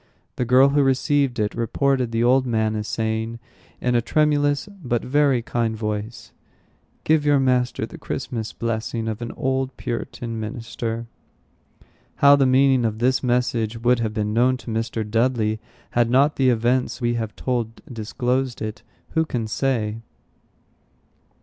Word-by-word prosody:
The 125 Hz, -, -1 dB
girl 130 Hz, +3 st, +6 dB
who 145 Hz, +1 st, +3 dB
received 135 Hz, -1 st, +2 dB
it 105 Hz, -1 st, 0 dB
reported 125 Hz, +1 st, 0 dB
the 115 Hz, 0 st, +1 dB
old 130 Hz, +2 st, +3 dB
man 110 Hz, -2 st, 0 dB
as 105 Hz, 0 st, -3 dB
saying, 110 Hz, +1 st, -2 dB, 0.4 s
in 125 Hz, -, 0 dB
a 120 Hz, -, +3 dB
tremulous, 145 Hz, -, +1 dB, 0.2 s
but 120 Hz, -2 st, -1 dB
very 135 Hz, -2 st, +2 dB
kind 115 Hz, -2 st, -1 dB
voice, 105 Hz, +1 st, -4 dB, 0.7 s
"Give 155 Hz, -1 st, +3 dB
your 145 Hz, -1 st, +4 dB
master 125 Hz, -3 st, +1 dB
the -, -, -12 dB
Christmas 115 Hz, -5 st, -4 dB
blessing 115 Hz, 0 st, -3 dB
of 110 Hz, 0 st, -4 dB
an 120 Hz, -, -4 dB
old 130 Hz, 0 st, -2 dB
Puritan 115 Hz, -1 st, -4 dB
minister." 115 Hz, 0 st, -4 dB, 1.1 s
How 140 Hz, 0 st, +7 dB
the 135 Hz, -2 st, +3 dB
meaning 130 Hz, -1 st, +4 dB
of 110 Hz, -2 st, -1 dB
this 130 Hz, +3 st, +2 dB
message 120 Hz, -3 st, 0 dB
would 125 Hz, 0 st, +4 dB
have 110 Hz, -2 st, -1 dB
been 105 Hz, -1 st, -1 dB
known 125 Hz, +3 st, +3 dB
to 115 Hz, -1 st, -8 dB
Mr. 115 Hz, -1 st, -2 dB
Dudley, 115 Hz, -1 st, +1 dB, 0.3 s
had 120 Hz, -1 st, +2 dB
not 140 Hz, +4 st, +4 dB
the 130 Hz, -1 st, +3 dB
events 120 Hz, +1 st, +1 dB
we 120 Hz, -1 st, 0 dB
have 115 Hz, -2 st, -3 dB
told 120 Hz, -3 st, -2 dB
disclosed 125 Hz, +1 st, -2 dB
it, 110 Hz, -1 st, -5 dB, 0.3 s
who 160 Hz, -, +1 dB
can 120 Hz, -7 st, -3 dB
say? 110 Hz, -2 st, -1 dB
120 Hz, 150 wpm, -23 LUFS, 115-130 Hz, 1.1 s, How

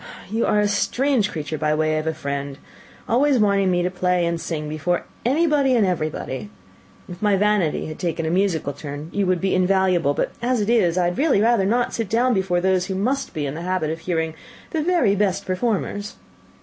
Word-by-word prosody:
"You 225 Hz, +2 st, 0 dB
are -, -, +2 dB
a -, -, +4 dB
very 205 Hz, -, +2 dB
strange 245 Hz, +1 st, +1 dB
creature 155 Hz, -1 st, -4 dB
by 150 Hz, 0 st, +1 dB
way 155 Hz, 0 st, +1 dB
of 155 Hz, -, -5 dB
a 160 Hz, -, 0 dB
friend! 140 Hz, -2 st, -4 dB, 0.5 s
always 270 Hz, +4 st, +3 dB
wanting 200 Hz, -3 st, +3 dB
me 175 Hz, -1 st, +1 dB
to 180 Hz, -, -1 dB
play 180 Hz, -1 st, +1 dB
and 170 Hz, -1 st, -2 dB
sing 155 Hz, -3 st, -4 dB
before 155 Hz, +4 st, -1 dB, 0.2 s
anybody 280 Hz, 0 st, +2 dB
and 225 Hz, -4 st, +3 dB
everybody! 155 Hz, -2 st, -3 dB, 0.6 s
If 175 Hz, 0 st, -10 dB
my 205 Hz, -2 st, +3 dB
vanity 205 Hz, -6 st, +1 dB
had 155 Hz, -, -7 dB
taken 165 Hz, -2 st, -2 dB
a 160 Hz, -, -1 dB
musical 175 Hz, -6 st, 0 dB
turn, 145 Hz, +2 st, -7 dB
you 200 Hz, -2 st, 0 dB
would 185 Hz, -, +3 dB
have -, -, -9 dB
been 185 Hz, -1 st, +2 dB
invaluable; 180 Hz, -6 st, +2 dB
but -, -, -1 dB
as 245 Hz, 0 st, +1 dB
it 210 Hz, +2 st, 0 dB
is, 185 Hz, -7 st, +3 dB
I 175 Hz, -1 st, +2 dB
would 175 Hz, -, -5 dB
really 290 Hz, -7 st, +3 dB
rather 225 Hz, -2 st, +3 dB
not 240 Hz, +3 st, +1 dB
sit 225 Hz, -4 st, -3 dB
down 245 Hz, +4 st, +2 dB
before 190 Hz, -3 st, +1 dB
those 185 Hz, 0 st, +1 dB
who 190 Hz, -, -3 dB
must 260 Hz, +8 st, -1 dB
be 150 Hz, -2 st, -2 dB
in 135 Hz, -, -3 dB
the 160 Hz, -, -6 dB
habit 180 Hz, -3 st, -1 dB
of 165 Hz, -, -4 dB
hearing 160 Hz, -2 st, -2 dB, 0.4 s
the 320 Hz, -, 0 dB
very 335 Hz, -, +2 dB
best 200 Hz, -1 st, 0 dB
performers." 205 Hz, +1 st, -2 dB
185 Hz, 215 wpm, -22 LUFS, 160-215 Hz, 0.6 s, a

